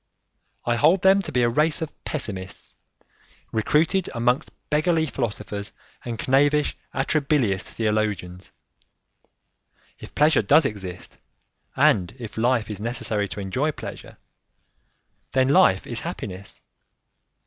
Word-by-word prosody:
I 120 0 +1
hold 175 +9 +4
them 190 +1 +6
to - - -6
be 125 - +2
a - - +4
race 150 +6 +2
of 160 - -7
pessimists, 95 -10 -4 0.8
recruited 155 - +1
amongst 125 +5 +1 0.2
beggarly 160 +2 +2
philosophers 105 -6 -4 0.3
and 120 -2 -5
knavish, 145 +3 +3 0.2
atrabilious 135 -8 +1
theologians. 105 -5 -2 1.5
If - - -12
pleasure 150 +2 +4
does 160 - +5
exist, 95 -5 -6 0.6
and 100 +1 +3
if 115 -4 -8
life 115 -2 +1
is 105 -1 -6
necessary 110 -3 -1
to 100 - -7
enjoy 130 +11 -1
pleasure, - - -9 1.2
then 130 0 +3
life 95 -8 +4
is - - -2
happiness. 95 +1 -7
120 Hz, 115 wpm, -24 LUFS, 105-150 Hz, 1.5 s, them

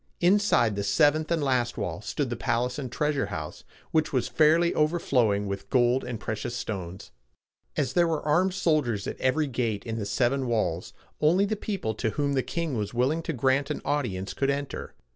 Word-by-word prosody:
Inside 175 - +3
the 100 - -2
seventh 150 +9 +3
and 165 -3 +1
last 125 -3 0
wall 100 -1 -3
stood 125 +4 -2
the - - -1
palace 125 +3 -1
and 130 -4 -5
treasure 145 -5 0
house, 80 -6 -6 0.3
which 160 -1 +1
was 130 -3 0
fairly 160 +2 +4
overflowing 130 -10 +2
with 100 0 -5
gold 125 0 +3
and 120 -3 -5
precious 110 +2 -4
stones. 95 -5 -5 0.7
As 130 - 0
there 175 -1 +4
were 160 -3 -2
armed 180 +5 +2
soldiers 145 - +1
at - - -6
every 150 +4 +2
gate 120 -6 -2
in 115 -1 -3
the 100 - -3
seven 130 +4 +1
walls, 105 -7 -1 0.3
only 175 +6 +4
the 215 +2 -1
people 195 - -3
to 110 - -1
whom 145 -1 +1
the 135 - +2
king 165 0 -3
was 105 0 -3
willing 135 +7 +1
to 165 - -3
grant 135 +2 +1
an 150 - -2
audience 100 -10 -2
could 135 - 0
enter. 140 0 -3
130 Hz, 190 wpm, -27 LUFS, 110-155 Hz, 0.7 s, fairly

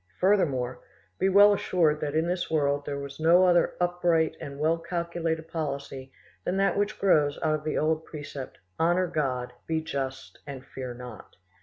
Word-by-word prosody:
Furthermore, 140 -11 +1 0.4
be 190 - +3
well 205 +2 +7
assured 165 -6 +1
that 150 0 -2
in 160 +2 +2
this 175 0 -2
world 145 -2 0
there 140 -1 -3
is 140 +1 -10
no 170 +3 +5
other 175 -1 +3
upright 175 -2 +1
and 140 0 -7
well 160 +2 +2
calculated 170 -1 -3
policy 140 -4 -5 0.3
than 185 - -1
that 195 0 +2
which 205 +1 -1
grows 150 -7 +3
out 155 -1 +2
of 155 0 -2
the 155 - -2
old 155 +1 +1
precept, 145 -4 -8 0.2
'Honour 175 +3 +3
God, 130 -7 -2
be 160 -1 0
just 135 -4 -5
and 135 -2 -8
fear 130 -3 -7
not. 125 -3 -11
160 Hz, 170 wpm, -27 LUFS, 140-175 Hz, 0.4 s, well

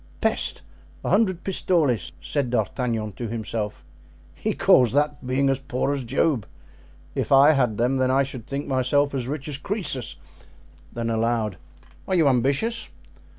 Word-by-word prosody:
"Peste! - - 0 0.4
a - - 0
hundred 190 -5 +2
pistoles!" 160 - +1
said 140 -4 -2
D'Artagnan 115 -1 -1
to 115 +5 -6
himself; 110 -1 -4 0.5
"he - - -2
calls 125 -4 +4
that 145 -2 0
being 135 +2 +1
as 135 -1 +1
poor 135 +1 -1
as 140 -2 -3
Job! 130 - 0 0.7
If - - -3
I 140 +2 +7
had 125 -8 +1
them 130 +3 +1
I 130 +1 +3
should 130 -4 -8
think 140 +1 -3
myself 140 +2 +1
as 130 -3 -2
rich 145 +1 -4
as 145 -2 -4
Croesus." 170 - 0 0.8
Then 115 -1 -3
aloud: 110 -3 0 0.5
"Are 190 - +1
you 165 -4 +4
ambitious?" 140 - +1
130 Hz, 150 wpm, -24 LUFS, 120-145 Hz, 0.8 s, I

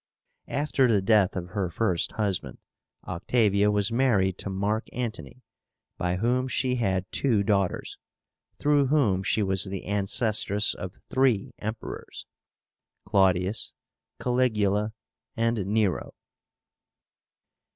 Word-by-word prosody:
After 140 -2 +1
the 110 -4 +3
death 100 -1 +3
of 90 -1 -4
her 95 -1 -2
first 90 -1 0
husband, 100 -4 -2 0.5
Octavia 100 +2 +2
was 105 0 +1
married 105 -7 +2
to - - -4
Mark 100 +3 -1
Antony, 125 +1 -5 0.6
by 90 0 0
whom 125 +6 +1
she 125 +1 0
had 95 -5 0
two 115 -7 +2
daughters, 100 -3 -1 0.6
through 145 -2 +3
whom 125 -10 +2
she 105 +2 +1
was 95 -1 +1
the 95 -1 -6
ancestress 105 +1 +1
of 90 +1 -8
three 130 -6 +2
Emperors, 110 +2 -6 0.8
CLAUDIUS, 95 +1 +1 0.4
CALIGULA, 110 -4 +1 0.4
and 115 -4 0
NERO. 105 -3 0
105 Hz, 110 wpm, -26 LUFS, 95-120 Hz, 0.8 s, the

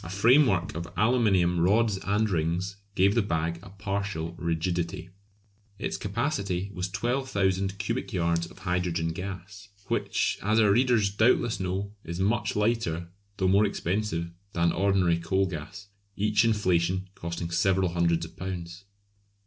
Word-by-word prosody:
A 85 - -7
framework 100 - +4
of 85 0 -5
aluminium 100 -7 +3
rods 100 +3 +3
and 105 +3 +1
rings 90 +2 -1 0.2
gave 95 +2 +4
the 120 - +3
bag 85 -3 -1
a 100 - -12
partial 100 -4 -3
rigidity. 85 +1 -2 0.7
Its - - -3
capacity 100 -1 -2
was 90 0 -3
12,000 100 -3 0
cubic 115 +7 -3
yards 85 -3 0
of - - -16
hydrogen 90 -3 -1
gas, 95 +3 -7 0.2
which, - - 0
as 110 +3 +2
our 105 -2 +5
readers 115 -3 +3
doubtless 110 0 +2
know, 95 +2 -2
is 85 +2 -6
much 105 +4 0
lighter 105 -6 0 0.3
though 95 - +1
more 100 +3 +5
expensive 95 -3 -1 0.2
than 85 0 +2
ordinary 95 -3 +2
coal 95 +4 +1
gas; 95 +4 -7 0.3
each 105 +1 +2
inflation 95 -4 +1
costing 85 -1 -5
several 95 +2 +2
hundreds 85 -1 +1
of 80 - -13
pounds. 90 0 -6
95 Hz, 140 wpm, -27 LUFS, 85-100 Hz, 0.7 s, our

